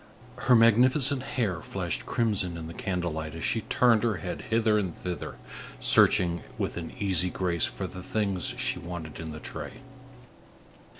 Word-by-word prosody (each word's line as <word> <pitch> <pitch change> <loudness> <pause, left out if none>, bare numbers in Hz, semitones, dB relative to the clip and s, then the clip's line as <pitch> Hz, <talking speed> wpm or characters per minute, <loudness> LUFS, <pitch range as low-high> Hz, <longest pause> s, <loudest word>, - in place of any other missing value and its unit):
Her 125 - +7
magnificent 125 +4 +5
hair 115 - -2
flashed - - -3
crimson 100 -7 0
in 80 - -6
the 80 - -7
candle 90 -2 -2
light, 80 0 -5
as 80 - -6
she 115 - +1
turned 115 0 +3
her 115 -3 +1
head 90 -1 -5
hither 110 -1 +3
and 95 -5 -3
thither, 90 -1 -5 0.4
searching 85 -1 +4 0.2
with - - -2
an 85 -1 -6
easy 90 -3 +2
grace 90 -2 0
for - - -4
the 95 - -7
things 100 0 -1
she 130 +1 0
wanted 85 -3 -7
in 80 -1 -5
the 80 - -7
tray. - - -7
95 Hz, 165 wpm, -28 LUFS, 85-115 Hz, 0.4 s, Her